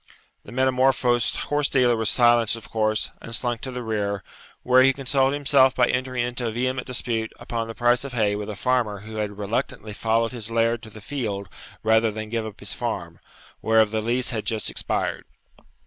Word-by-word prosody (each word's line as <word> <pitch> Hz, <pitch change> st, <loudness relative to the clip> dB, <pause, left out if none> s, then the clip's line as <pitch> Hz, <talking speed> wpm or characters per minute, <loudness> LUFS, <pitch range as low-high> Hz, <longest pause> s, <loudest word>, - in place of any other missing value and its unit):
The -, -, -12 dB
metamorphosed 130 Hz, -1 st, +2 dB
horse 145 Hz, -1 st, 0 dB
dealer 125 Hz, -3 st, +3 dB
was 110 Hz, -2 st, +1 dB
silenced 120 Hz, -2 st, +4 dB
of 115 Hz, -, -12 dB
course, 110 Hz, -1 st, 0 dB
and 115 Hz, -, -4 dB
slunk 120 Hz, -2 st, -2 dB
to 135 Hz, -, -5 dB
the 125 Hz, -1 st, -5 dB
rear, 100 Hz, -3 st, -2 dB, 0.4 s
where 125 Hz, 0 st, +5 dB
he 135 Hz, +1 st, +5 dB
consoled 135 Hz, 0 st, +1 dB
himself 135 Hz, -2 st, +4 dB
by 125 Hz, -, +4 dB
entering 130 Hz, -1 st, 0 dB
into 120 Hz, 0 st, -3 dB
a -, -, -1 dB
vehement 125 Hz, +2 st, -2 dB
dispute 115 Hz, -3 st, -2 dB
upon 115 Hz, -1 st, -3 dB
the 115 Hz, -, -7 dB
price 120 Hz, +1 st, +2 dB
of 140 Hz, -, -6 dB
hay 105 Hz, -4 st, +1 dB
with 105 Hz, 0 st, -5 dB
a 105 Hz, -, -4 dB
farmer 115 Hz, -3 st, 0 dB
who 110 Hz, +1 st, -8 dB
had 105 Hz, -1 st, -3 dB
reluctantly 105 Hz, +1 st, -3 dB
followed 115 Hz, +2 st, +1 dB
his 115 Hz, -3 st, -6 dB
laird 115 Hz, 0 st, +1 dB
to 110 Hz, -, -10 dB
the 110 Hz, 0 st, -12 dB
field 105 Hz, -6 st, -4 dB, 0.3 s
rather 110 Hz, +1 st, +4 dB
than 110 Hz, 0 st, -6 dB
give 115 Hz, -1 st, -2 dB
up 105 Hz, -, -11 dB
his -, -, -2 dB
farm, -, -, -4 dB, 0.4 s
whereof 110 Hz, -1 st, +4 dB
the 110 Hz, 0 st, 0 dB
lease 125 Hz, +4 st, 0 dB
had 110 Hz, -3 st, -2 dB
just 110 Hz, -2 st, -2 dB
expired. -, -, -2 dB
115 Hz, 195 wpm, -24 LUFS, 110-125 Hz, 0.4 s, where